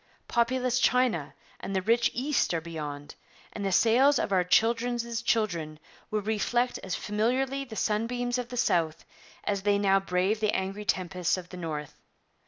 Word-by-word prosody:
Populous 250 +1 +1
China 250 - +2 0.2
and 195 - -5
the 190 - +1
rich 230 +3 +3
East 265 - +1
are - - +1
beyond; 150 -3 -7 0.4
and 205 - -5
the 195 - 0
sails 250 +8 +5
of - - -1
our 185 -2 +3
children's 235 +3 +1
children 175 -10 0 0.3
will 215 -1 -1
reflect 240 +4 0
as 190 - -4
familiarly 255 +6 -1
the 235 -4 -9
sunbeams 245 +4 -1
of 245 -1 -5
the 250 - -6
South 165 -9 +1 0.4
as 200 -1 -1
they 205 0 +2
now 195 -1 +3
brave 195 +2 0
the 215 -1 +1
angry 195 +2 -3
tempests 180 -2 0
of 180 -1 -8
the 180 - -9
North. 155 -4 -6
210 Hz, 165 wpm, -28 LUFS, 180-240 Hz, 0.4 s, sails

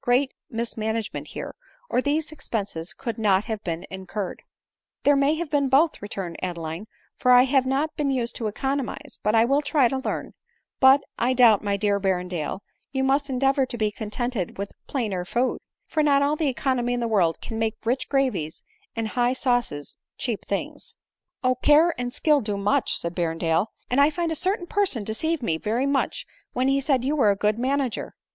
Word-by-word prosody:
great 260 +2 +2 0.2
mismanagement 225 -2 -3
here, - - -6 0.3
or 250 - +1
these 300 +3 0
expenses 200 - -4
could 230 +3 -5
not 200 -2 +3
have 220 -2 -4
been 165 -1 -3
incurred," 190 +1 -5 0.3
" - - -64
There 285 - +5
may 280 +2 +3
have 330 -1 -4
been 285 -2 +2
both," 300 +5 +3
returned 195 -4 -5
Adeline, 170 +2 -4 0.2
" - - -39
for 250 - +1
I 250 0 +8
have 265 0 +2
not 280 +4 0
been 290 -2 0
used 245 -3 -1
to 225 - -2
economize, 270 +4 -3
but 210 +1 +1
I 225 0 +5
will 275 +4 +2
try 285 -3 +3
to 265 - -1
learn; 265 - -4 0.5
but, 265 +1 +7 0.2
I 250 +2 +2
doubt, 235 -5 +6
my 200 -1 0
dear 200 0 +1
Berrendale, 180 -3 -2 0.3
you 265 -1 0
must 275 +2 +2
endeavor 270 +1 +2
to 245 - -5
be 215 -2 +1
contented 215 -2 -3
with 200 +1 -4 0.2
plainer 210 -9 -2
food; 240 +8 0 0.3
for 310 - 0
not 280 -2 +4
all 290 +2 +2
the 305 -3 +1
econ 260 0 0
omy 245 0 0
in 245 - -1
the 235 - -1
world 185 -7 +2
can 225 -1 -5
make 225 -1 0
rich 250 +3 0
gravies 245 - 0 0.3
and 225 -1 -2
high 245 +2 +1
sauces 245 - -1 0.2
cheap 235 -5 -3
things." 200 - -4 0.3
" - - -46
Oh! 255 0 +4
care 300 +6 +4
and 245 0 -2
skill 300 +3 +3
can 275 - -3
do - - -4
much," 200 +1 +1
said 170 0 -4
Berrendale; 165 +2 +1
— - - -47
" - - -45
and 265 +3 +4
I 285 - +6
find 335 +1 -2
a - - -1
certain 375 +3 0
person 365 - 0
deceived 285 +8 -1
me 165 -7 0
very 230 +8 0
much 280 -1 0 0.3
when 255 +2 +1
he 275 0 +2
said 265 -3 +1
you 285 +4 +1
were 255 -8 +4
a 200 - +3
good 210 +3 0
manager." 265 -1 -1
245 Hz, 205 wpm, -25 LUFS, 205-275 Hz, 0.5 s, I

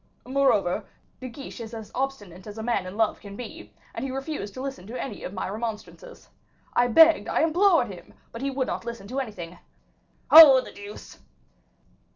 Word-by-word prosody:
"Moreover, 245 -8 +1 0.4
De 255 - -7
Guiche 270 +2 -10
is 230 0 -8
as 220 -2 -9
obstinate 210 -10 -5
as 210 +1 -9
a 220 - -5
man 220 -6 -1
in 185 +3 -8
love 220 -1 +1
can 200 -1 -11
be, 245 - -9 0.2
and - - -5
he 270 - -3
refused 270 -6 -5
to 255 - -6
listen 270 -9 -6
to 240 +3 -6
any 270 - -6
of - - -6
my 190 - -4
remonstrances. 225 - -7 0.5
I 240 0 +3
begged, 325 +7 +6
I - - +1
implored 335 -2 +3
him, 180 -3 -12 0.2
but 230 - -8
he 275 - -1
would 265 -1 -2
not - - -4
listen 235 -4 -7
to 260 +3 -3
anything. 180 -9 -7 0.7
Oh, 300 -5 +11
the 255 - -8
deuce!" 205 +1 -11
235 Hz, 190 wpm, -25 LUFS, 205-270 Hz, 0.7 s, Oh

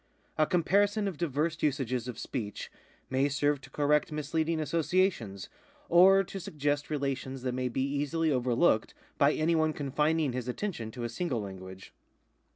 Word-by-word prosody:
A 155 - +3
comparison 200 +4 +2
of 185 -6 -5
diverse 160 0 -1
usages 130 -4 0
of 125 -3 -6
speech 110 -7 -5 0.4
may 135 +2 +2
serve 145 0 +1
to - - -13
correct 150 +1 +1
misleading 155 +2 -1
associations, 155 - 0 0.4
or 190 +3 +7
to 195 +1 -7
suggest 145 -3 -2
relations 135 -3 -3
that 125 -1 -1
may 125 0 -1
be 130 +2 -1
easily 145 +3 0
overlooked 125 -1 +2 0.2
by 140 +1 +5
any 160 +2 +1
one 155 -1 +2
confining 150 0 0
his 125 -1 -4
attention 125 - -3
to 120 +2 -7
a - - -1
single 125 -1 -2
language. 95 -1 -9
145 Hz, 155 wpm, -30 LUFS, 125-165 Hz, 0.4 s, or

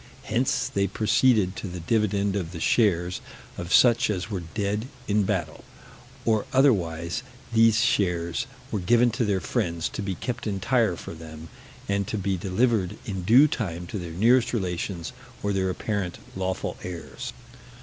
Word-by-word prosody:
Hence - - 0
they 100 0 0
proceeded 110 -1 +3
to - - -5
the 90 -1 -6
dividend 100 +1 +1
of 90 -4 -3
the 85 - -6
shares 90 -3 +2 0.3
of 85 0 -6
such 120 +1 +5
as 100 +1 -2
were 100 - -1 0.2
dead 105 +3 -1 0.2
in 105 -1 +2
battle, 90 -6 -2 0.6
or 110 -2 +2
otherwise: 85 - +2 0.3
these 115 0 +5
shares 85 -6 +1 0.2
were 105 - -1
given 120 +6 +4
to 115 +2 -1
their 100 -2 +1
friends, 85 -8 -1
to - - -5
be 100 -2 -2
kept 120 +4 -4
entire 105 0 +1
for - - -8
them, 80 0 -10 0.4
and 100 -1 0
to 110 - -2
be 100 -1 0
delivered 95 +1 +1
in 95 -3 -3
due 120 +11 +6
time 90 - -3
to 100 +3 -5
their 85 -2 -6
nearest 115 +8 +3
relations, 90 -2 -3 0.3
or 100 0 0
their 95 -1 +1
apparent 95 -1 -2 0.2
lawful 95 0 -2
heirs. 85 -3 -6
100 Hz, 160 wpm, -26 LUFS, 90-110 Hz, 0.6 s, due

